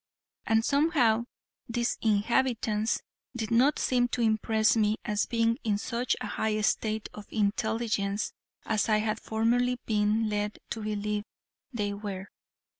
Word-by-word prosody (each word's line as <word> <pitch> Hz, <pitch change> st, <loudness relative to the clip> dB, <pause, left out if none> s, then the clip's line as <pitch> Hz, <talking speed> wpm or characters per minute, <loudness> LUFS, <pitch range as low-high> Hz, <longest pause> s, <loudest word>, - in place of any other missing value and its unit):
And 225 Hz, 0 st, +3 dB
somehow 280 Hz, -6 st, +3 dB, 0.4 s
these 235 Hz, +1 st, -1 dB
inhabitants 220 Hz, 0 st, +1 dB, 0.3 s
did 220 Hz, -1 st, -3 dB
not 260 Hz, +6 st, +4 dB
seem 245 Hz, -1 st, +2 dB
to 245 Hz, 0 st, -2 dB
impress 220 Hz, 0 st, +3 dB
me 215 Hz, -1 st, +2 dB
as 210 Hz, 0 st, 0 dB
being 230 Hz, +1 st, +1 dB
in 210 Hz, -3 st, +1 dB
such 235 Hz, +3 st, -1 dB
a -, -, -4 dB
high 215 Hz, -1 st, -1 dB
state 215 Hz, 0 st, 0 dB
of 210 Hz, -1 st, -10 dB
intelligence 210 Hz, -1 st, 0 dB, 0.3 s
as 220 Hz, 0 st, +1 dB
I 215 Hz, -, +4 dB
had 215 Hz, +1 st, -1 dB
formerly 245 Hz, +3 st, +1 dB
been 215 Hz, +1 st, +2 dB
led 210 Hz, 0 st, -2 dB
to 225 Hz, -, -3 dB
believe 210 Hz, 0 st, -2 dB, 0.5 s
they 205 Hz, -5 st, -2 dB
were. 200 Hz, -2 st, -6 dB
220 Hz, 135 wpm, -29 LUFS, 210-235 Hz, 0.5 s, not